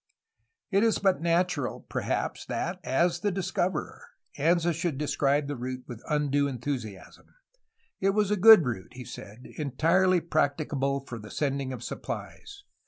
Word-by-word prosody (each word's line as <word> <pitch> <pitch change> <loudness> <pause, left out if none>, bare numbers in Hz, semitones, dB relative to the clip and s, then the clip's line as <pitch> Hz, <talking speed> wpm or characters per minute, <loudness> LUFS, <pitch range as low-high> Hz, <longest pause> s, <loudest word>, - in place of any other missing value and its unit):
'' 455 - -51
It 195 0 +3
is 225 -1 +3
but 190 -3 +2
natural, 170 -4 0
perhaps, - - -2
that, - - -3
as 170 +7 +1
the 210 - 0
discoverer, 185 -3 -2 0.3
Anza 170 +3 +2
should 170 -3 -2
describe 145 0 +1
the 145 - -3
route 125 +1 -5
with 120 -2 -8
undue 145 -2 +1
enthusiasm. 120 -6 -6 0.6
It 195 - +2
was 210 -1 +2
a - - +4
good 210 -3 +8
route, 110 -7 -4
he 125 -1 -8
said, 110 +4 -10
entirely 165 +6 +2
practicable 145 -4 0
for 125 -4 -8
the 105 0 -10
sending 140 -1 -2
of 125 -2 -6
supplies. 405 - -7
150 Hz, 150 wpm, -28 LUFS, 130-180 Hz, 0.6 s, good